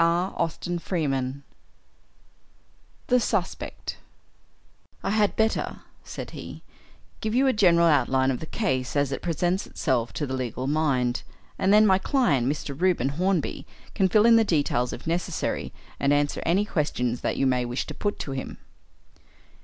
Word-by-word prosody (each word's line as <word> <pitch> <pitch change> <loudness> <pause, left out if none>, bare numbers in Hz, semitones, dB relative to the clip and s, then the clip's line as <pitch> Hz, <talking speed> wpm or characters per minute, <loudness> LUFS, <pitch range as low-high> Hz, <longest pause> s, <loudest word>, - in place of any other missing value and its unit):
CHAPTER 175 0 -1 0.2
II 135 -4 -1 1.6
THE 250 0 +3
SUSPECT 210 -5 -3 1.1
"I - - -1
had 210 -1 +2
better," 220 0 0 0.2
said - - -7
he, - - -9 0.6
"give 220 +1 -2
you 265 +2 +4
a 265 - +3
general 175 -5 +4
outline 135 -4 +3
of 125 - -3
the 160 - -7
case 130 - -1
as 140 -1 +1
it 135 - -3
presents 175 +3 -1
itself 120 -6 -1
to 150 - -2
the 130 - -5
legal 130 -1 -3
mind, 135 -4 +1 0.4
and 190 - +2
then 210 +1 +7
my 190 -2 +4
client, 185 - +2
Mr. 140 0 -3
Reuben 170 -5 +1
Hornby, 170 -2 -1 0.3
can 190 -2 +2
fill 210 +3 +4
in 230 -1 +7
the 225 - +5
details 145 - +1
if - - -8
necessary, 170 +2 -2 0.3
and 140 - +2
answer 145 0 +1
any 195 +5 +3
questions 125 - -1
that - - -1
you 135 - +2
may 125 -1 +2
wish 120 +2 -3
to - - -7
put 205 -1 -2
to 140 - -5
him. 135 -1 -5
160 Hz, 155 wpm, -26 LUFS, 135-190 Hz, 1.6 s, then